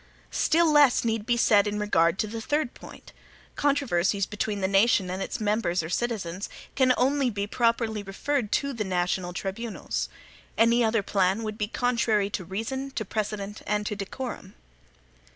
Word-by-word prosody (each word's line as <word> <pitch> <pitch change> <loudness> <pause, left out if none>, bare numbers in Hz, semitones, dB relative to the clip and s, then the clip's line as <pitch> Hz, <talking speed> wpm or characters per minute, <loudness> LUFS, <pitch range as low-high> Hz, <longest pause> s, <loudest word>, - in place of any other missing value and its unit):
Still 335 +2 +3
less 290 -5 +5
need 225 -2 -1
be 240 -1 +2
said 210 -3 +4
in 205 0 -2
regard 180 -4 +2
to 215 - 0
the 225 +2 -6
third 290 +1 -1
point. - - -13 0.4
Controversies 205 -9 +1
between 210 0 -3
the 190 - +1
nation 195 -1 +3
and 185 +1 -4
its - - -3
members 210 -5 0
or 160 - -5
citizens, 200 -4 -2 0.2
can 260 -1 +3
only 270 +1 +2
be 200 -3 -2
properly 230 -1 0
referred 210 +4 -2
to 280 -1 0
the 225 -3 -2
national 180 -1 -1
tribunals. 195 +5 -4 0.5
Any 235 +1 +4
other 220 -2 +2
plan 195 +2 +1
would 215 0 -5
be 210 - 0
contrary 225 -4 +1
to 190 - -3
reason, 225 +9 -4
to 230 -5 -4
precedent, 205 0 -4
and 210 0 0
to 210 - -2
decorum. 205 0 -6
215 Hz, 165 wpm, -26 LUFS, 195-240 Hz, 0.5 s, less